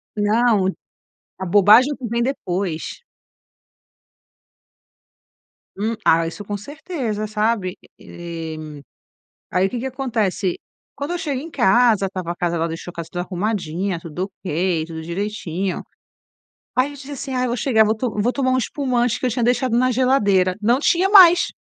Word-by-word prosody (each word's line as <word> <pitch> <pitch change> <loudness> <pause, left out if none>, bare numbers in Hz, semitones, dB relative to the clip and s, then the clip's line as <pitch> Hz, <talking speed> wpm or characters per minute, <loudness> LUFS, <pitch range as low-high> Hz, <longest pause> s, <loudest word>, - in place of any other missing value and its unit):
Não, 210 -1 +2 0.7
a 190 - -4
bobagem 210 +8 +6
é - - -2
o - - -12
que 250 - -6
vem 235 +1 0
depois. 190 - -3 2.8
Hum, 220 +3 -1
ah, 165 0 +4
isso 205 +5 -7
com 205 0 -4
certeza, 250 - -4
sabe, 210 -3 -1 0.2
eh. 165 -2 -7 1.0
Aí 180 +2 +2
o - - -4
que 245 - -3
que 260 - -4
acontece? 225 -8 -1 0.4
Quando 285 +3 -4
eu 350 - -2
chego 285 -6 -2
em 325 +3 -8
casa, 230 -4 +3
estava 185 -3 -5
a - - -11
casa 170 -1 -1
ela 165 +1 0
deixou 165 +2 -6
a - - -33
casa 170 -1 -6
tudo 175 - -3
arrumadinha, 185 -2 -2
tudo 180 +4 -5
ok, 170 -1 0
tudo 160 -1 -7
direitinho. 190 0 -3 0.9
Aí 255 +3 +2
eu - - -10
disse 285 0 -10
assim: 270 -1 -5
"Ai, 255 0 0
eu - - -1
vou 240 +1 -2
chegar, 220 -2 +3
vou 215 +1 +1 0.3
vou 245 +4 +2
tomar 260 -1 0
um 255 - +2
espumante 245 -2 0
que - - -3
eu - - +2
tinha 240 0 -1
deixado 245 0 +1
na 255 +1 +3
geladeira". 205 -8 +2
Não 240 +5 +3
tinha 360 +5 +2
mais. 360 -4 +8
215 Hz, 165 wpm, -21 LUFS, 185-255 Hz, 2.8 s, mais